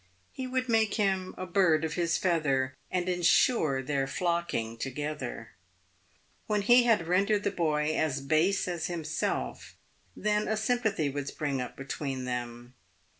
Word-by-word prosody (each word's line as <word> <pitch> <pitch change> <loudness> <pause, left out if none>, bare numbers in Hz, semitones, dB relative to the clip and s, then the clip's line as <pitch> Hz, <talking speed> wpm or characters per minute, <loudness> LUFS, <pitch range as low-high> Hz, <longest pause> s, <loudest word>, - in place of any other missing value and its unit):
He 260 - -5
would 255 0 -1
make 225 -2 +2
him 190 -3 0
a 185 - -4
bird 170 -4 +3
of 155 - -3
his 170 -1 +1
feather, 140 -7 +1 0.2
and 180 -1 -1
ensure 170 - +3
their 135 0 -1
nocking 170 -8 -1
toge 145 +4 -4
ther. 120 -3 -6 1.0
When 210 -1 +1
he 240 +3 +6
had 220 -8 +3
rendered 200 +4 +2
the 200 - 0
boy 155 -2 0
as 155 -3 0
base 155 +9 +1
as 175 -3 -2
himself, 160 - -3 0.4
then 210 0 0
a 220 - 0
sympathy 220 - 0
would 145 0 -4
spring 140 -3 -2
up 125 - -6
between 135 -1 -4
them. 120 0 -5
165 Hz, 150 wpm, -29 LUFS, 135-200 Hz, 1.0 s, he